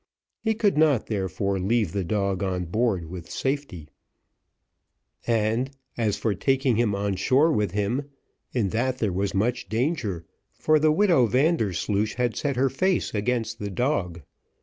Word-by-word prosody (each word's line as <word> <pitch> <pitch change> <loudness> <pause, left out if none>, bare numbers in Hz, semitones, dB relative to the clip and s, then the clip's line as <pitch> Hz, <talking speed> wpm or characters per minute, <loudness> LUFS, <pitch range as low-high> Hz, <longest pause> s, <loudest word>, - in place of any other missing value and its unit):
He 220 -1 +1
could 205 -7 +2
not, 150 -7 +3
therefore, 100 -1 -2
leave 105 -1 +1
the 100 0 -2
dog 100 +1 -1
on 90 -2 -1
board 100 -1 0
with 85 0 -9
safety; 135 - -3 1.4
and, 115 +2 +1 0.3
as 110 -4 0
for 110 - 0
taking 135 +4 +1
him 115 -4 +2
on 100 0 -1
shore 135 - +3
with 105 - 0
him, 120 +8 -1 0.4
in 110 -6 0
that 125 +4 -1
there 105 -7 -1
was 100 +2 -1
much 120 +5 0
danger, 110 - -1 0.3
for 155 0 +2
the 155 +1 +4
widow 165 - +4
Vandersloosh 110 - +1
had 120 -1 0
set 140 -2 -1
her 130 +1 +2
face 185 +5 0
against 115 +1 -1
the 100 - -4
dog. 95 - -1
110 Hz, 150 wpm, -25 LUFS, 100-135 Hz, 1.4 s, the